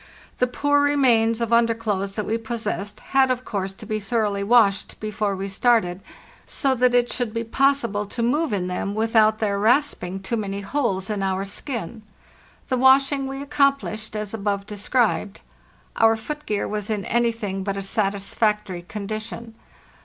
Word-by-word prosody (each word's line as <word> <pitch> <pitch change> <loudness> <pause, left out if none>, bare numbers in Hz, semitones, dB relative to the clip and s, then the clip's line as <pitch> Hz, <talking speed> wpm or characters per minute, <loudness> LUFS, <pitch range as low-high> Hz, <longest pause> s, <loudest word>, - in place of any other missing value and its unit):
The 250 - +3
poor 285 +3 +2
remains 240 -6 +3
of 230 0 0
underclothes 225 -4 +1
that 210 0 -3
we 225 +1 -1
possessed 215 -2 -4
had, 270 -1 +5
of 255 0 -1
course, 195 -2 -3
to 205 - -11
be 215 0 -2
thoroughly 205 -1 -1
washed 205 -2 +3
before 215 -1 -2
we 195 +1 -4
started, 195 -3 +1 0.4
so 275 -4 0
that 250 -1 +2
it 245 0 +2
should 235 -3 -3
be 230 - -1
possible 235 -4 +1
to 235 +3 -3
move 295 +5 +1
in 195 -3 -1
them 185 +2 -3
without 220 -1 +3
their 205 -2 -1
rasping 220 -5 +1
too 195 +5 -3
many 200 -2 -3
holes 200 -4 -1
in 205 -2 -2
our 190 0 -1
skin. 225 - -5 0.7
The 255 - 0
washing 270 +1 +4
we 270 +1 -5
accomplished 275 -7 0
as 210 -1 -4
above 200 -2 -2
described. 210 0 0 0.6
Our 225 0 +4
foot 295 +7 -7
gear 210 -1 -1
was 210 0 -3
in 210 -3 -2
anything 225 -5 -1
but 195 0 -2
a 195 - -3
satisfactory 200 -1 0
condition. 215 +4 -6
220 Hz, 160 wpm, -23 LUFS, 200-245 Hz, 0.7 s, had